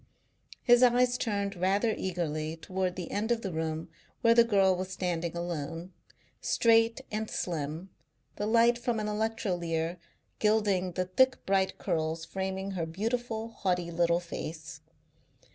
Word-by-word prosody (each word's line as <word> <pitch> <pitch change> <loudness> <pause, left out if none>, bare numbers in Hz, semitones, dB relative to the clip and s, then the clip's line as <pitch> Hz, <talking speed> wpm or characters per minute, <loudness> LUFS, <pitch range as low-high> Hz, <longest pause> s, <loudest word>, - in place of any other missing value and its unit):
His 245 -1 +6
eyes 245 0 +5
turned 200 -4 -1
rather 195 +5 +2
eagerly 160 -3 -3
towards 185 +1 -2
the 180 -2 -6
end 215 +3 -1
of 230 -1 0
the 190 -4 -3
room 160 0 -2 0.3
where 230 0 +6
the 235 0 +7
girl 195 -4 +3
was 185 +1 -4
standing 175 -3 -2
alone, 170 +1 -4 0.5
straight 230 0 +3
and 215 0 -2
slim, 160 +2 -3 0.5
the 205 - -1
light 235 +1 +4
from 240 -2 -1
an 215 - -2
electrolier 180 -6 -1 0.4
gilding 205 -4 +2
the 185 +1 -1
thick 260 +9 +2
bright 190 -1 +1
curls 160 -2 -2
framing 190 0 -3
her 170 -4 -2
beautiful, 225 +5 -2
haughty 180 -5 -1
little 170 0 +2
face. 160 -2 -7
190 Hz, 140 wpm, -30 LUFS, 170-220 Hz, 0.5 s, the